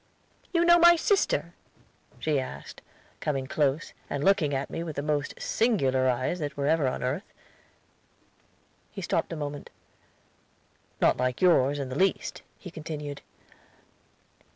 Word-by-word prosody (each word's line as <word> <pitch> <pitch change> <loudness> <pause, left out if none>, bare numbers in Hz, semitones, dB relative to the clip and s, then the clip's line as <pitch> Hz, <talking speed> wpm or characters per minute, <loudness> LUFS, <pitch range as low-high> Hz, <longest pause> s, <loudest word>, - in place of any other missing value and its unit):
"'You 340 -1 +2
know 345 0 +7
my 345 0 +8
sister?' 390 +4 +1 0.6
she 150 -3 0
asked, 130 - -8 0.4
coming 135 -3 -2
close, 145 +2 0 0.2
and 145 0 -2
looking 195 -6 +3
at 135 -1 -2
me 165 - -3
with 165 -3 -5
the 140 - -3
most 145 -1 -2
singular 135 - +1
eyes 130 +8 -1
that 145 -2 -4
were 140 - -1
ever 155 -2 +2
on 130 - -2
earth." 140 +11 -3 1.6
He 195 - -8
stopped 165 0 -1
a - - -3
moment. 145 -2 -5 1.3
"Not - - +4
like 125 0 -1
yours, 145 -6 +4
in 135 -2 -4
the 130 - -4
least," 195 0 0 0.2
he 180 - -10
continued. 150 -3 -6
150 Hz, 140 wpm, -27 LUFS, 135-180 Hz, 1.6 s, my